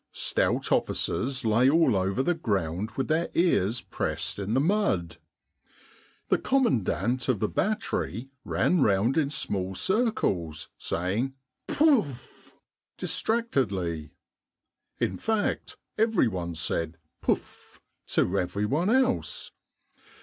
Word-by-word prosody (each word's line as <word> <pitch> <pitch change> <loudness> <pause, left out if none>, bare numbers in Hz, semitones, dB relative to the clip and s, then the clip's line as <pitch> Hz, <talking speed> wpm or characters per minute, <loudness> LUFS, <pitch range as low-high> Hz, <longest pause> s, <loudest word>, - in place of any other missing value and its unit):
Stout - - 0
officers 130 0 0
lay 115 +4 +4
all 155 -6 +4
over 95 +6 +1
the 175 - +2
ground 100 - -1
with 135 - 0
their 160 +2 +1
ears 125 - +2
pressed - - -2
in 100 +3 -1
the - - +4
mud. 150 - +1 1.1
The - - +3
commandant 130 - +1
of 120 -6 +2
the 105 - +1
battery 170 - -2
ran 180 -4 +1
round 105 +2 +3
in 155 -4 +2
small 95 -9 -2
circles 95 - 0
say 90 +4 -2
ing 135 +3 -1 0.3
Pouff! 225 - +1 0.4
distractedly. 100 - -1 0.8
In - - -1
fact 220 -2 -1 0.2
every 220 - +3
one 85 -5 -3
said 80 0 -2 0.2
Pouff! - - -3 0.3
to 95 +2 +1
every 100 +3 -1
one 155 - +1
else. 255 +1 +1
125 Hz, 115 wpm, -27 LUFS, -, 1.1 s, lay